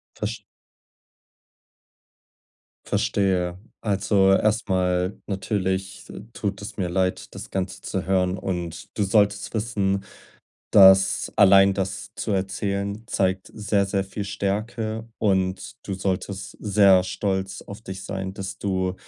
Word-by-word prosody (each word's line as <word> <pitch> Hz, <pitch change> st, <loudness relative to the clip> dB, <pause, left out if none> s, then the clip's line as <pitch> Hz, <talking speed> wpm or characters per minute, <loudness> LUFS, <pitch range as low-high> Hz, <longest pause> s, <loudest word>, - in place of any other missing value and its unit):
Verst -, -, -4 dB, 2.4 s
Verstehe. 90 Hz, -3 st, 0 dB, 0.2 s
Also, 100 Hz, -1 st, +2 dB
erstmal: 95 Hz, -3 st, +1 dB
Natürlich, 95 Hz, -1 st, -2 dB
äh, -, -, -8 dB
tut 100 Hz, -2 st, -3 dB
es 100 Hz, -, -8 dB
mir 90 Hz, -4 st, -1 dB
leid, 95 Hz, +1 st, -1 dB
das -, -, -8 dB
Ganze 95 Hz, -1 st, -3 dB
zu -, -, -3 dB
hören. 95 Hz, -1 st, +1 dB
Und 85 Hz, -3 st, -4 dB
du 100 Hz, -, +3 dB
solltest 100 Hz, 0 st, +2 dB
wissen, 100 Hz, -3 st, 0 dB, 0.7 s
dass 95 Hz, -1 st, +6 dB
allein 100 Hz, -1 st, +7 dB
das 95 Hz, -1 st, -3 dB
zu -, -, -3 dB
erzählen 100 Hz, +2 st, -2 dB
zeigt 95 Hz, -3 st, -1 dB
sehr, 105 Hz, -2 st, +1 dB
sehr 95 Hz, 0 st, -1 dB
viel 100 Hz, +1 st, -5 dB
Stärke 110 Hz, +3 st, -3 dB
und 95 Hz, -2 st, 0 dB
du 100 Hz, -, -3 dB
solltest 95 Hz, +1 st, -3 dB
sehr 100 Hz, -3 st, +5 dB
stolz 95 Hz, 0 st, -2 dB
auf 100 Hz, +2 st, -10 dB
dich 95 Hz, -1 st, -7 dB
sein, 95 Hz, -1 st, -4 dB
dass 100 Hz, 0 st, -6 dB
du 95 Hz, -2 st, -1 dB
95 Hz, 120 wpm, -24 LUFS, 95-100 Hz, 2.4 s, allein